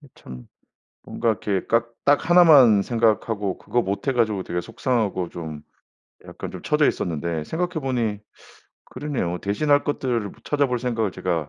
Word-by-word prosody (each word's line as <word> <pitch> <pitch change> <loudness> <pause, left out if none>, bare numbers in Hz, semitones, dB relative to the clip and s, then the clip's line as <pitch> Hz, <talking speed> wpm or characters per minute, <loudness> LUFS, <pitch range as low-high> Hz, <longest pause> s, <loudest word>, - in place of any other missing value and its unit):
그 145 - -18
참 60 -1 -11 0.6
뭔가 115 - -2
이렇게 100 -3 -1
깍 115 +1 +1
딱 145 +3 +2
하나만 145 - +7
생각하고 110 -3 0
그거 120 - -1
못해 100 +8 -2
가지고 110 -6 0
되게 90 0 -3
속상하고 110 -4 -2
좀 80 -3 -7 0.6
약간 - - -8
좀 - - -8
쳐져 - - +2
있었는데 80 -1 -2
생각해 175 - -3
보니 115 -6 -1 0.7
그러네요. 125 -11 -3
대신할 145 +8 +1
것들을 130 -5 -1
뭐 - - -15
찾아볼 140 -4 0
생각을 115 -5 -1
제가 85 -5 -2
115 Hz, 330 characters per minute, -23 LUFS, 95-130 Hz, 0.7 s, 하나만